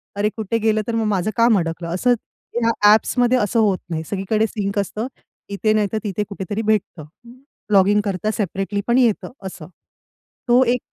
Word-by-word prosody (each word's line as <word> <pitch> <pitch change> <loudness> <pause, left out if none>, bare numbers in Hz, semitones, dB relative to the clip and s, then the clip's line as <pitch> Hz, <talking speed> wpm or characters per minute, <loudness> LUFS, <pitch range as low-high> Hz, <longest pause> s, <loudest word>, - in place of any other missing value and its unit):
अरे 205 +1 +1
कुठे 220 +1 -1
गेलं, 220 -1 +1
तर 235 - -1
मग 225 -1 0
माझं 190 +3 -1
काम 230 -2 +5
अडकलं, 165 0 -4
असं 245 +7 +3 0.5
या 230 - +3 0.2
ॲप्समध्ये 245 +3 +3
असं 230 0 +1
होत 205 -4 +2
नाही, 160 -1 -3
सगळीकडे 210 +3 0
सिंक 200 -1 -2
असतं, 210 +4 -3 0.4
इथे 210 +2 0
नाहीतर 215 0 0
तिथे 210 -1 -2
कुठेतरी 200 +2 -4
भेटतं. 210 -7 -1 0.7
लॉगिन 200 +1 +5
करता 205 +1 -2
सेपरेटली 200 0 -2
पण 235 +1 +3
येतं 235 -5 +2
असं. 180 -4 -8 0.8
तो 245 +2 +5
एक 250 0 +1
210 Hz, 165 wpm, -20 LUFS, 195-225 Hz, 0.8 s, काम